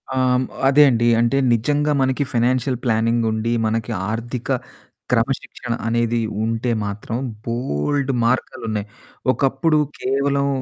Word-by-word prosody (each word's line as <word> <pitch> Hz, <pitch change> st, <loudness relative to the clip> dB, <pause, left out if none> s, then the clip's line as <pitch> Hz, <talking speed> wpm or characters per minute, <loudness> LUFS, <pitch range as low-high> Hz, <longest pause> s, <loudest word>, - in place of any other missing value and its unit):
ఆహ్, -, -, +1 dB, 0.2 s
హ్మ్. 130 Hz, +1 st, +1 dB, 0.2 s
అదే 140 Hz, +2 st, +6 dB
అండి. 120 Hz, -1 st, +2 dB
అంటే 120 Hz, +3 st, +2 dB, 0.2 s
నిజంగా 145 Hz, +6 st, +1 dB
మనకి 130 Hz, +2 st, +1 dB
ఫినాన్షియల్ 125 Hz, +2 st, +1 dB
ప్లానింగుండి. 115 Hz, 0 st, +1 dB
మనకి 110 Hz, 0 st, -1 dB, 0.2 s
ఆర్థిక 115 Hz, +2 st, -4 dB, 0.6 s
క్రమశిక్షణ 120 Hz, 0 st, -1 dB
అనేది 115 Hz, 0 st, +1 dB, 0.2 s
ఉంటే 115 Hz, +2 st, -1 dB
మాత్రం 105 Hz, +2 st, -4 dB, 0.3 s
బోల్డు 125 Hz, -, -1 dB
మార్గాలున్నాయి. 115 Hz, -3 st, -1 dB, 0.5 s
ఒకప్పుడు 135 Hz, +4 st, +1 dB, 0.2 s
కేవలం 140 Hz, +1 st, +1 dB
120 Hz, 105 wpm, -21 LUFS, 115-135 Hz, 0.6 s, అదే